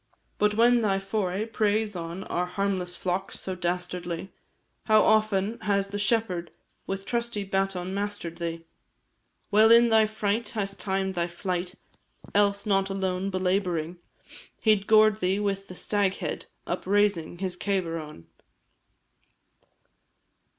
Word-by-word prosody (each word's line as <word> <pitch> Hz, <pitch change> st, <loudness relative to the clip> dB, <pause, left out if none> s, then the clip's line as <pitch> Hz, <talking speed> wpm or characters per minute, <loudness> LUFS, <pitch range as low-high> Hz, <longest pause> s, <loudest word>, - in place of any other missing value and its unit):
But 210 Hz, 0 st, +3 dB
when 240 Hz, +2 st, +5 dB
thy 200 Hz, -3 st, +2 dB
foray 195 Hz, 0 st, -2 dB
preys 215 Hz, -1 st, 0 dB
on 170 Hz, +2 st, -5 dB
Our 180 Hz, +1 st, -2 dB
harmless 185 Hz, -2 st, -2 dB
flocks, 185 Hz, +1 st, -3 dB
so 190 Hz, -, -3 dB
dastardly, 180 Hz, 0 st, -3 dB, 0.5 s
How 215 Hz, -1 st, +5 dB
often 215 Hz, 0 st, +2 dB
has 200 Hz, -1 st, 0 dB
the 205 Hz, +1 st, -4 dB
shepherd 205 Hz, -5 st, 0 dB, 0.4 s
With 195 Hz, 0 st, -4 dB
trusty 235 Hz, -3 st, -1 dB
baton 190 Hz, -1 st, -1 dB
master'd 200 Hz, -4 st, -3 dB
thee; 165 Hz, -1 st, -4 dB, 0.9 s
Well 215 Hz, +2 st, +6 dB
in 235 Hz, +1 st, +7 dB
thy 220 Hz, -1 st, +5 dB
fright 215 Hz, +1 st, -1 dB
hast 195 Hz, -3 st, -3 dB
timed 190 Hz, -1 st, -1 dB
thy 170 Hz, -1 st, -1 dB
flight, 180 Hz, +1 st, -3 dB, 0.6 s
Else, 200 Hz, 0 st, +2 dB
not 195 Hz, -2 st, +2 dB
alone, 190 Hz, 0 st, -1 dB
belabouring, 180 Hz, -3 st, -1 dB, 0.7 s
He 220 Hz, -, +6 dB
'd 200 Hz, -1 st, -7 dB
gored 215 Hz, -1 st, +5 dB
thee 190 Hz, +1 st, +1 dB
with 195 Hz, -1 st, -2 dB
the 185 Hz, -, -9 dB
Staghead, 200 Hz, 0 st, -1 dB, 0.2 s
Up -, -, -4 dB
raising 200 Hz, -5 st, +2 dB
his 185 Hz, -1 st, -3 dB
cabar 180 Hz, -4 st, -1 dB
on. 150 Hz, -, -10 dB
195 Hz, 130 wpm, -27 LUFS, 180-210 Hz, 0.9 s, in